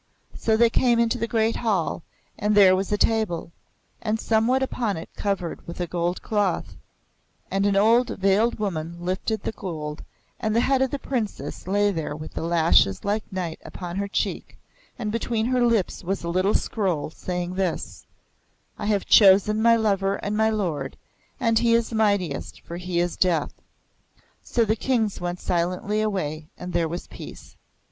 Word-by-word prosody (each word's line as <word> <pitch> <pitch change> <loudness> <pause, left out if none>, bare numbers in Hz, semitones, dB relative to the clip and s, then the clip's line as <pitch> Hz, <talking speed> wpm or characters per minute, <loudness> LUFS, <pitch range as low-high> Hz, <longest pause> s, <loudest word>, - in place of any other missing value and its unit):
So 220 -1 +1
they 235 0 +4
came 240 -1 +3
into 235 +1 +1
the 230 - -1
great 225 0 +1
Hall, 205 -10 0 0.3
and 210 +1 0
there 190 -2 +7
was 190 +2 -2
a 210 - +2
table, 205 -8 0 0.5
and 220 0 -1
somewhat 230 +4 +2
upon 230 -7 -1
it 160 - -8
covered 195 -4 -3
with 170 - -7
a 175 - 0
gold 175 +1 -2
cloth; 205 -3 -1 0.8
and 195 +1 +2
an 200 - +2
old 230 +5 +4
veiled 195 +5 +2
woman 170 -6 -3
lifted 185 +5 -2
the - - -2
gold, 155 -7 -6 0.4
and 215 0 -1
the 230 - +4
head 265 +1 +2
of 265 - +2
the 285 - -3
Princess 235 -9 -4
lay 205 +2 +2
there 160 -5 -3
with 155 +1 -8
the - - -4
lashes 165 - +3
like 210 +1 -2
night 180 -4 -4
upon 175 -1 -7
her 200 0 -1
cheek, 200 - -3 0.4
and 215 -3 -3
between 230 0 -1
her 250 0 +2
lips 230 -7 +1
was 195 +1 -2
a 170 - -3
little 185 +4 +1
scroll, 180 -9 -1
saying 180 +1 -4
this: 165 - -3 0.7
'I - - -3
have 205 -2 +1
chosen 205 +1 +6
my 230 +1 +6
Lover 200 -3 +1
and 205 +1 -3
my 220 +1 +3
Lord, 195 -9 -2 0.4
and 230 -3 +3
he 230 -1 +3
is 230 0 0
mightiest, 200 -9 0
for 170 - -8
he 180 -1 -2
is 175 0 0
Death.' 170 -5 0 0.8
So 235 -2 +1
the 215 +1 +1
Kings 225 -5 0
went 175 0 -3
silently 180 +5 -1
away. 160 -8 -2
And 180 0 -7
there 170 -1 +1
was 175 +2 -5
Peace." - - -11
200 Hz, 175 wpm, -24 LUFS, 175-220 Hz, 0.8 s, there